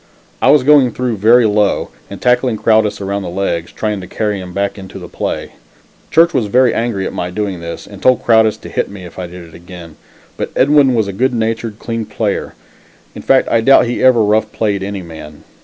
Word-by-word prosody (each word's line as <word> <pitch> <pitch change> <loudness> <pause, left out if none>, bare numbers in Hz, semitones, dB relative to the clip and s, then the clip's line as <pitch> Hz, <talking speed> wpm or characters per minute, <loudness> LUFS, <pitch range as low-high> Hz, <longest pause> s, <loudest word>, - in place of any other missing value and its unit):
I - - +3
was 145 -2 +5
going 140 -2 +5
through 120 -1 -3
very 115 +4 +5
low 105 -1 +1 0.2
and - - -8
tackling 125 -2 +1
Crowdis 110 0 +2
around 100 +1 -3
the 90 - -5
legs, 85 -2 -3
trying 105 -2 -3
to 90 - -9
carry 105 -3 -2
him 90 -1 -9
back 100 +2 -3
into 95 -1 -10
the - - -9
play. - - -4 0.6
Church 170 +1 +4
was 120 -6 0
very 125 +3 +3
angry 115 -5 -2
at - - -5
my 90 - -3
doing 95 -1 -4
this, 85 0 -7
and 100 -1 -13
told 130 -1 +3
Crowdis 110 -2 +3
to - - -9
hit - - -2
me, 100 -2 -10
if 90 - -11
I 90 - -5
did 90 0 -11
it 80 - -18
again, 85 -2 -12 0.4
but - - -3
Edwin 140 -1 +4
was 110 -3 +1
a 100 - -5
good 130 +5 0
natured, 115 -1 -2
clean 115 -1 -5
player; - - -3 0.6
in - - -9
fact, 135 -1 +3
I 115 - +2
doubt 135 +3 +5
if 120 - -3
he 120 - -2
ever 125 -3 +5
rough 105 +1 +1
played 100 -3 -1
any 100 -1 -5
man. 80 -3 -11
105 Hz, 225 wpm, -15 LUFS, 95-120 Hz, 0.6 s, was